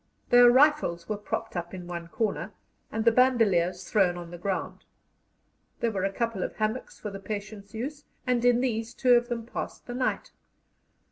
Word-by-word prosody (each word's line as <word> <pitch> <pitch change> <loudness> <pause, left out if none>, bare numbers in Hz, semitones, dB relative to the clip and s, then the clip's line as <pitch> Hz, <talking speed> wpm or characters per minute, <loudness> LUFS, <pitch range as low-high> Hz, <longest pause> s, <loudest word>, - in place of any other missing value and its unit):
Their 245 0 +8
rifles 255 - +3
were 215 - -1
propped 205 -1 -4
up 175 +1 -4
in 180 -1 -8
one 170 -1 -6
corner, 215 +4 -2 0.4
and 220 0 -2
the 230 - +7
bandoliers 195 -8 +3
thrown 185 -5 +2
on 175 -1 -8
the 175 - -7
ground. 190 +1 -3 1.0
There 235 -1 +1
were 195 -2 -1
a 195 - 0
couple 230 -2 -2
of - - -3
hammocks 215 +3 -2
for 210 - -5
the 195 - -7
patients' 205 +1 -7
use, 285 +6 -5 0.2
and 250 -2 +1
in 245 0 +4
these 230 -3 -2
two 250 -1 +4
of 240 0 +3
them 230 -2 -3
passed 235 - -6
the 245 - -6
night. 255 +1 -1
220 Hz, 185 wpm, -27 LUFS, 190-245 Hz, 1.0 s, Their